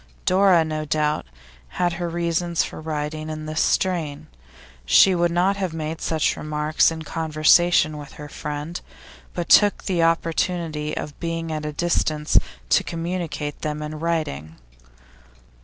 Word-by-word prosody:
Dora, 185 -3 +4
no 155 -1 -3
doubt, 150 - 0 0.5
had 175 -1 +1
her 175 0 -3
reasons 170 0 0
for - - -7
writing 155 0 -4
in 155 0 -5
this 155 +1 -1
strain. 155 -5 0 0.6
She 65 - +6
would 175 -1 +2
not 180 +4 +1
have 190 -4 -2
made 160 0 -4
such 160 -2 +1
remarks 150 0 +1
in 160 -1 -6
conversation 155 0 +3
with 145 -1 -10
her 150 - -9
friend, 150 +3 -5 0.5
but 175 -2 -3
took 205 -1 +5
the 180 -4 0
opportunity 165 -2 0
of 145 - -6
being 165 -1 -3
at 155 -1 -3
a - - -3
distance 155 -1 +1 0.3
to - - +4
communicate 165 -3 -4
them 150 0 -3
in 155 0 -6
writing. 155 - -2
160 Hz, 140 wpm, -23 LUFS, 150-170 Hz, 0.6 s, She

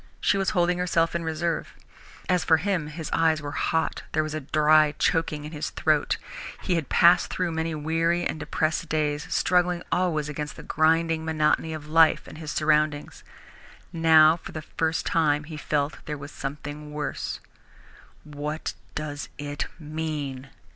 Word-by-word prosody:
She - - +2
was 195 - +1
holding 175 0 +2
herself 165 -2 +1
in 170 0 -2
reserve. 165 +1 -2 0.5
As 180 -2 +2
for 160 - +5
him, 175 -2 -1
his 155 0 -6
eyes 160 -1 +3
were 145 -1 -6
hot, 160 0 -1
there 155 - +2
was 155 0 -4
a 155 - -2
dry 150 +1 +4
choking 155 -3 0
in 150 - -7
his 150 -2 -4
throat. - - +1 0.5
He 185 - 0
had 165 -5 -1
passed 175 +1 +5
through 180 -2 -1
many 160 0 -2
weary 165 +3 0
and 155 - -2
depressed 155 +2 -1
days, 150 +1 -1
struggling 180 -1 +2
always 165 -5 +1
against 150 0 -5
the - - -10
grinding 160 +1 +2
monotony 160 0 +1
of 155 -2 -6
life 160 +1 +4
and 155 - -10
his 155 -2 -6
surroundings. 150 -1 0 0.7
Now 160 -1 +6
for - - -11
the 155 - -5
first 160 +2 -1
time 150 -2 +2
he 155 +1 -8
felt 150 -1 -1
that - - -15
there 150 -1 -3
was 145 +1 -9
something 150 +1 -6
worse. 150 0 -4 0.8
"What 150 +1 -4 0.2
does 145 -2 -4
it 145 0 -4
mean?" 150 -4 -4
155 Hz, 165 wpm, -26 LUFS, 150-165 Hz, 0.8 s, Now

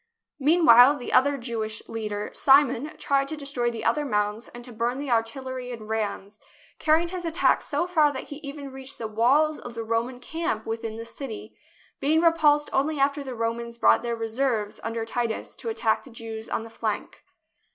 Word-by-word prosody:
Meanwhile 290 -3 +7
the 245 - -6
other 280 +2 +4
Jewish 225 -3 -4
leader, 210 -2 -4
Simon, 275 +1 +3
tried 275 -1 +1
to 315 - -5
destroy 275 -4 -1
the 230 -1 -6
other 300 - +2
mounds 210 -3 -1
and 240 0 -10
to 245 - -9
burn 235 +3 -1
the 280 0 -4
artil 230 +3 0
lery 255 -1 -5
and 225 -3 -8
rams, 215 -1 -3 0.4
carrying 320 +2 +3
his 365 0 -5
attack 330 +1 +2
so 345 - -1
far 315 -5 +3
that 260 - -7
he 290 - -6
even 280 -1 -8
reached 265 +1 -7
the 225 - -4
walls 270 +8 +3
of 240 -1 -9
the 230 - -3
Roman 230 +3 -1
camp 250 -5 -3
within 225 0 -4
the 230 - -6
city, 230 0 -8 0.4
being 310 +3 +3
repulsed 305 -3 +4
only 290 +2 +1
after 280 +1 +1
the 260 -2 -6
Romans 235 +1 -3
brought - - +5
their 235 -1 -2
reserves 225 -1 -1
under 225 0 -3
Titus 230 0 -3
to 460 - -5
attack 230 - 0
the 275 - -14
Jews 225 -1 -7
on - - -2
the 225 - -11
flank. 215 -2 -4
245 Hz, 190 wpm, -26 LUFS, 225-285 Hz, 0.4 s, Meanwhile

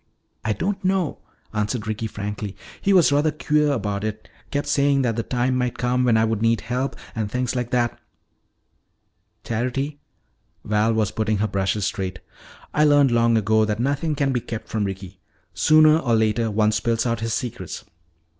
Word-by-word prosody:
"I 110 - +1
don't 190 - -2
know," 185 -5 0 0.3
answered 105 +2 -1
Ricky 110 +1 -3
frankly. 105 -1 -5 0.2
"He 200 - +2
was 180 -6 +5
rather 145 +2 +3
queer 150 -1 +1
about 105 -6 -2
it. 110 0 -4 0.2
Kept 145 0 -2
saying 140 -1 +2
that 115 -3 0
the 115 - 0
time 125 +2 0
might 125 -1 -1
come 125 +1 +1
when 115 -2 +4
I 110 - +3
would 110 -1 -1
need 115 -1 +2
help, 125 +4 -2 0.2
and 110 -3 -2
things 125 +2 -2
like 125 -1 -2
that." 120 -1 0 1.4
"Charity," 130 +5 -2 0.7
Val 105 +1 +2
was 110 -3 +1
putting 110 -1 0
her 110 +2 +1
brushes 100 0 -1
straight, 95 -3 -3 0.6
"I 150 - +3
learned 145 -3 +5
long 115 -1 +3
ago 110 +1 +3
that 105 0 -1
nothing 145 +5 0
can 140 -1 0
be 125 - 0
kept 115 -1 -6
from 110 -2 -1
Ricky. 95 -1 -7 0.3
Sooner 155 0 +5
or 120 -7 +1
later 110 +1 +1
one 105 0 +2
spills 115 +2 0
out 115 -1 0
his 115 0 -1
secrets." 120 -1 -5
115 Hz, 175 wpm, -23 LUFS, 110-135 Hz, 1.4 s, was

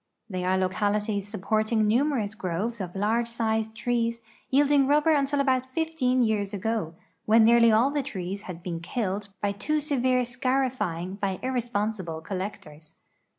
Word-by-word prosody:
They 185 -5 -4
are 185 +1 +2
localities 205 +2 0
supporting 215 +2 0
numer 255 +2 +2
ous 205 0 -5
groves 205 +4 -3
of 180 -1 -6
large 220 +4 +1
sized 220 -1 -1
trees 230 +1 -1 0.3
yielding 280 0 +4
rubl)er 300 +2 +4
until 280 0 +1
about 260 -2 +1
fifteen 290 -6 +1
years 210 -3 0
ago, 205 -5 -2 0.3
when 220 +1 +6
nearly 230 0 +6
all 230 +6 +4
the 290 0 0
trees 195 -5 -5
bad 175 -2 -8
Ijcen 170 -2 -4
killed 200 +1 -3 0.2
by 200 - +2
too 305 +10 -1
severe 255 -4 +1
scarifying 240 -8 -1
by 195 -2 -1
irresponsible 215 -9 -2
collectors. 165 -4 -7
220 Hz, 150 wpm, -26 LUFS, 195-255 Hz, 0.3 s, when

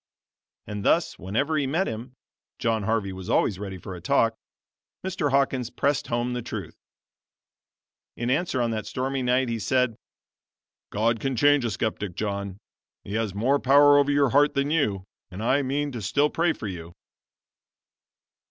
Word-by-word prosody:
And 105 -1 -5
thus 165 +9 +2
whenever 140 - -1
he 140 - 0
met 165 +8 +1
him 115 +3 -6 0.4
(John 115 -1 0
Harvey 100 -2 -1
was 95 +2 -8
always 100 -4 +2
ready 95 -2 -5
for 95 +1 -8
a 90 - -9
"talk,") 115 +2 +2 0.7
Mr. 180 -6 -1
Hawkins 135 -3 +1
pressed 140 0 0
home 120 +1 -1
the 125 - -3
truth. 105 -7 -6 1.4
In 120 +1 -1
answer, 140 -3 +1
on 115 - 0
that 110 -2 -3
stormy 130 +3 -2
night, 125 +1 +2
he 115 -1 -2
said: 125 +1 +1 0.9
"God 115 +2 +1
can 135 +3 -2
change 145 +2 +4
a - - 0
skeptic, 105 -3 -3
John. 100 -2 -3 0.5
He 100 - -7
has 110 -3 -1
more 130 +7 +2
power 145 +2 +6
over 140 0 +2
your 140 -1 +3
heart 145 +3 +4
than 140 +1 0
you, 105 -12 +1 0.3
and 95 +4 -7
I 135 +4 +3
mean 140 +1 -2
still 145 +9 +2
to - - -20
pray 170 0 +2
for - - -8
you." 85 -3 -7
120 Hz, 165 wpm, -25 LUFS, 105-140 Hz, 1.4 s, power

